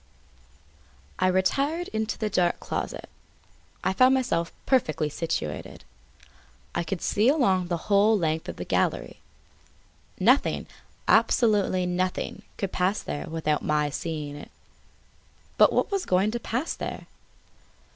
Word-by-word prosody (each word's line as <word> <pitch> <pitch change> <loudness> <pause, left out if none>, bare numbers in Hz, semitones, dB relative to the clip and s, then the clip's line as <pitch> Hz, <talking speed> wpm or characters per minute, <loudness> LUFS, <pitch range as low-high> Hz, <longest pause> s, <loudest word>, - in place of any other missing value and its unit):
I 185 - +3
retired 275 - +1
into 220 0 -2
the 220 - -1
dark 180 -4 +1
closet. - - -4 0.8
I 190 - +1
found 255 +5 +5
myself 170 -11 0
perfectly 155 - +1
situated. 145 - -4 0.9
I - - -1
could 175 +1 -4
see 215 +5 +3
along 195 - +2
the 175 -1 -1
whole 210 +2 +4
length 160 -3 -1
of - - -5
the - - -6
gallery. - - -1 1.0
Nothing, - - +3 0.4
absolutely 205 -6 +3
nothing 180 +1 -2 0.2
could 195 -2 -3
pass 185 +3 0
there 145 - -5
without 155 -2 -1
my 150 -1 +1
seeing 150 -2 -4
it. 145 - -10 1.1
But - - +7
what - - +1
was 395 -2 -1
going 190 +3 +2
to 240 - -3
pass 250 +7 -2
there? - - -6
185 Hz, 125 wpm, -26 LUFS, 165-220 Hz, 1.1 s, But